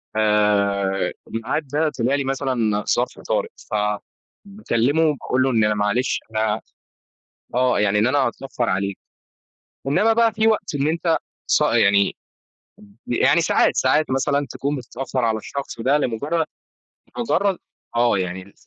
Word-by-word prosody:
آآ، 100 -2 +2
الميعاد 115 +7 -3
ده 150 +3 +1
طلع 125 +4 +2
لي 140 - -1
مثلًا 125 -6 -1
ظرف - - -2
طارق - - -1 0.2
ف - - -5 0.7
باكلمه 155 - +1
باقول 130 0 0
له 135 - +2
إن 110 -3 +2
أنا 105 - +3
معلش 105 +5 0
أنا 110 0 0 0.9
آه، 125 -2 +2
يعني 105 0 +2
إن 110 - +3
أنا 135 +3 +1
هاتأخر 130 -2 -2
عليك 100 +1 -1 0.9
إنما 215 +11 +3
بقى 230 -1 +3
في 220 +1 +2
وقت 205 -7 0
إن 140 +1 0
أنت 165 +1 +1 0.3
صا - - +3
يعني 100 0 +3 0.9
يعني 120 - +3
ساعات، - - +2
ساعات 155 -3 +2
مثلًا 140 +2 +1
تكون 140 +2 -2
متأخر 130 0 -3
على 110 -1 +1
الشخص 135 0 -6
ده 135 +5 +3
لمجرد 150 +6 -1 0.7
لمجرد 200 -5 +1 0.4
آه 120 -3 +3
يعني. 95 +1 -5
130 Hz, 140 wpm, -22 LUFS, 105-145 Hz, 0.9 s, أنا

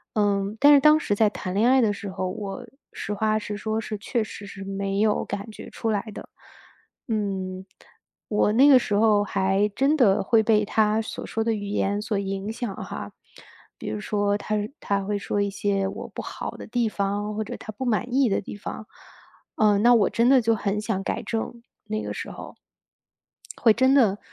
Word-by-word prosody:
嗯， 200 -1 +1
但 290 +1 +7
是 - - +7
当 305 +2 +6
时 205 - -1
在 215 +1 +4
谈 185 -3 -5
恋 220 +4 +3
爱 265 0 +5
的 220 - +3
时 200 0 -7
候， 185 0 -3
我 200 +5 -6 0.3
实 210 - -4
话 215 +1 +1
实 210 0 -5
说 220 +1 -2
是 215 - -5
确 235 +2 -1
实 205 -1 -9
是 195 0 -9
没 195 0 -3
有 215 -1 +2
感 200 +2 -5
觉 - - -10
出 225 - -3
来 205 -2 0
的。 - - -9 0.8
嗯， 190 -4 -2 0.6
我 210 -1 +2
那 270 +5 +6
个 270 -3 +8
时 205 -4 -2
候 210 -1 +4
还 195 +1 +1
真 275 +3 +3
的 200 -8 +4
会 220 +3 +4
被 215 -1 +3
他 215 +1 +2
所 220 - -6
说 225 - -1
的 225 0 +1
语 205 -2 -4
言 205 0 0
所 215 -1 -2
影 195 +1 -3
响 225 -3 -4
哈。 - - -7 0.6
比 - - -8
如 210 - -4
说 205 -1 0
他 215 +1 -3 0.3
他 200 -1 -1
会 205 0 -1
说 205 0 -2
一 200 - 0
些 195 0 -1
我 195 - -6
不 - - -7
好 - - -6
的 - - -10
地 240 -2 0
方， 205 +1 -2
或 220 - -1
者 - - -6
他 - - -8
不 240 +5 -6
满 240 +1 -1
意 270 -2 +4
的 195 - 0
地 205 - -8
方， 210 +1 -7 0.7
嗯， 210 -2 +3
那 245 - +7
我 210 -4 +3
真 235 +1 +2
的 265 -2 +6
就 230 0 +2
很 205 0 -2
想 210 -3 -2
改 - - -3
正， 225 - -2
那 - - -9
个 - - -17
时 235 -1 -18 0.7
候。 - - -10 1.0
会 225 - +5
真 260 +4 +3
的 215 -8 +4
210 Hz, 220 characters per minute, -25 LUFS, 200-225 Hz, 1.0 s, 个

